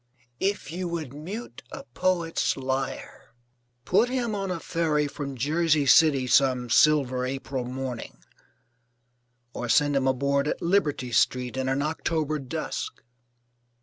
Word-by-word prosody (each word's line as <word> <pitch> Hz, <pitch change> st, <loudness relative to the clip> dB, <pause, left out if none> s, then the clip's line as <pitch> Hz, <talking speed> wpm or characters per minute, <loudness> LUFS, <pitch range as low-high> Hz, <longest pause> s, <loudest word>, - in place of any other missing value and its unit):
If 200 Hz, -4 st, -1 dB
you 180 Hz, +2 st, -3 dB
would 160 Hz, -6 st, -4 dB
mute 165 Hz, -, -7 dB
a -, -, -7 dB
poet's 175 Hz, -5 st, 0 dB
lyre, 130 Hz, -3 st, -4 dB, 0.5 s
put 215 Hz, +7 st, +3 dB
him 245 Hz, -3 st, -1 dB
on 195 Hz, -2 st, -3 dB
a 180 Hz, -2 st, -2 dB
ferry 155 Hz, -3 st, 0 dB
from 140 Hz, -2 st, -6 dB
Jersey 155 Hz, +2 st, +2 dB
City 140 Hz, -2 st, +5 dB
some 125 Hz, -2 st, +2 dB
silver 130 Hz, -2 st, +4 dB
April 130 Hz, 0 st, -3 dB
morning; 125 Hz, -1 st, -6 dB, 1.4 s
or 120 Hz, -, -5 dB
send 145 Hz, +5 st, +3 dB
him 135 Hz, -1 st, +2 dB
aboard 140 Hz, +2 st, +1 dB
at -, -, -2 dB
Liberty 155 Hz, -9 st, 0 dB
Street 125 Hz, +1 st, +1 dB
in 130 Hz, 0 st, -1 dB
an 135 Hz, +2 st, 0 dB
October 155 Hz, -1 st, -1 dB
dusk. 130 Hz, -2 st, -5 dB
145 Hz, 130 wpm, -26 LUFS, 130-165 Hz, 1.4 s, City